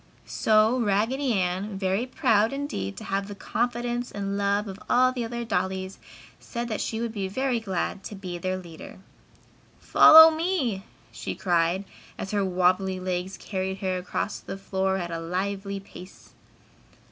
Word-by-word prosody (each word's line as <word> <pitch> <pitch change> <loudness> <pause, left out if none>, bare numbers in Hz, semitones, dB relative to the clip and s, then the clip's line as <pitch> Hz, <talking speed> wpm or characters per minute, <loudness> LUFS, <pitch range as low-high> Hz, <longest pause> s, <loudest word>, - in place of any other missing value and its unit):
So 220 +3 +3
Raggedy 235 +6 +1
Ann, 190 +1 -1
very 195 +5 0
proud 225 -6 +2
indeed 275 - -4
to - - -7
have 195 0 -2
the 205 - -7
confidence 240 +3 -2
and 200 -1 -3
love 200 +1 0
of 195 0 -7
all 255 +1 +4
the 250 -2 -3
other 235 +1 -4
dollies, 190 -2 -2 0.4
said 235 0 -5
that 215 - -2
she 220 - -2
would 235 -1 -2
be 200 -3 -3
very 255 +4 -1
glad 195 -1 -3
to 210 - -6
be 180 -3 -6
their 185 +1 -2
leader. 170 -3 -10 0.8
"Follow 320 +1 +9
me!" 315 - -1 0.3
she - - -5
cried 175 +1 +1 0.3
as 190 - -5
her 205 -1 +1
wobbly 185 0 +1
legs 185 +1 -3
carried 190 -1 -3
her 185 -1 0
across 200 +2 -3
the - - -7
floor 190 0 -1
at 175 -2 -4
a 165 - -3
lively 195 +3 -3
pace. 185 -1 -14
200 Hz, 160 wpm, -26 LUFS, 185-235 Hz, 0.8 s, Follow